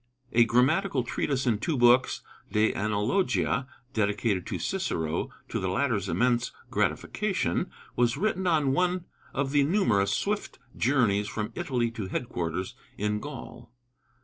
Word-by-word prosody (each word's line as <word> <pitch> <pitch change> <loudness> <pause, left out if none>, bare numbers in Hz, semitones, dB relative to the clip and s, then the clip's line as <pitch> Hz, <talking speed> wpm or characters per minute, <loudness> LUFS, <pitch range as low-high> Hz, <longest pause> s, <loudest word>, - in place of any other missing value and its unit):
A 120 0 +5
grammatical 135 +5 +2
treatise 130 +2 -1
in 115 -4 +2
two 160 +1 -1
books 120 +1 +4 0.3
(De 105 +1 +3
Analogia), 110 - +1 0.3
dedicated 105 -2 0
to - - -2
Cicero, 80 +1 -1 0.2
to - - -2
the 95 - -1
latter's 105 -1 0
immense 120 -1 +2 0.2
gratification, - - 0 0.3
was 120 -1 +2
written 190 -3 0
on 150 -5 +3
one 180 +2 +1 0.3
of 135 -1 -1
the 145 0 +4
numerous 140 - +2
swift 210 +1 -1 0.2
journeys 110 -6 +2
from 105 0 -3
Italy 125 -9 -1
to 110 -5 -5
headquarters 90 -5 -3 0.2
in 105 +1 0
Gaul. 120 -4 -9
120 Hz, 130 wpm, -28 LUFS, 105-140 Hz, 0.3 s, A